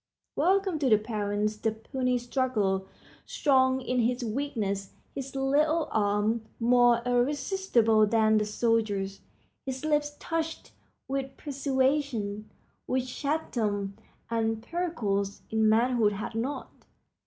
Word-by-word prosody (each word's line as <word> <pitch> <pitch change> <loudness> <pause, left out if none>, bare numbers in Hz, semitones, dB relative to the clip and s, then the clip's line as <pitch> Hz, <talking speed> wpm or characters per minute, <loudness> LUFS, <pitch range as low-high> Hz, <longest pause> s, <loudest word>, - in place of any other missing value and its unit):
Welcome 380 -3 +2
to 275 -3 +2
the 215 - +6
parents 210 -1 -2
the 220 +1 0
puny 250 +3 -1
struggler, 240 -6 0 0.4
strong 260 -2 +2
in 255 0 -1
his 245 +2 +1
weakness, 215 -6 -2 0.2
his 270 0 -6
little 300 +4 +2
arms 210 +2 +1 0.2
more 240 0 +4
irresistible 245 - +2
than 220 0 +3
the 210 - 0
soldier's, 210 -3 0 0.4
his 265 +2 -5
lips 295 -1 +1
touched 325 -1 -3 0.4
with 270 0 -3
persuasion 265 -6 -1 0.4
which 255 0 -1
Chatham 215 -10 -1 0.3
and 225 -1 -1
Pericles 225 - -2
in 220 0 +3
manhood 230 -1 +3
had 205 +3 -5
not. 245 +6 -3
240 Hz, 110 wpm, -28 LUFS, 215-275 Hz, 0.4 s, the